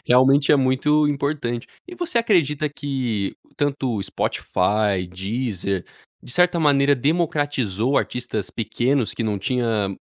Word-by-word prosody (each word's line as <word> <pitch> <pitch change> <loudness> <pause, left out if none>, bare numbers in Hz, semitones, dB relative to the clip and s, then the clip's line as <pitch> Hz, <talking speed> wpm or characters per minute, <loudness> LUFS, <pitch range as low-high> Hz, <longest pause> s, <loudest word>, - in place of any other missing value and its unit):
Realmente 135 +4 +5
é - - +6
muito 140 +3 +2
importante. 140 -4 -2 0.2
E 355 - -9
você 345 -9 -1
acredita 155 - +2
que 130 -9 -3 0.2
tanto 140 -4 -1
o 100 - -2
Spotify, 95 0 0
Deezer, 100 -1 -3 0.4
de 120 - -7
certa 180 -1 +3
maneira 140 -1 +4
democratizou 140 - 0
artistas 120 -5 -3
pequenos, 120 +3 0
que - - -3
não 105 -3 -1
tinha 110 -3 -1
130 Hz, 125 wpm, -22 LUFS, 110-145 Hz, 0.4 s, é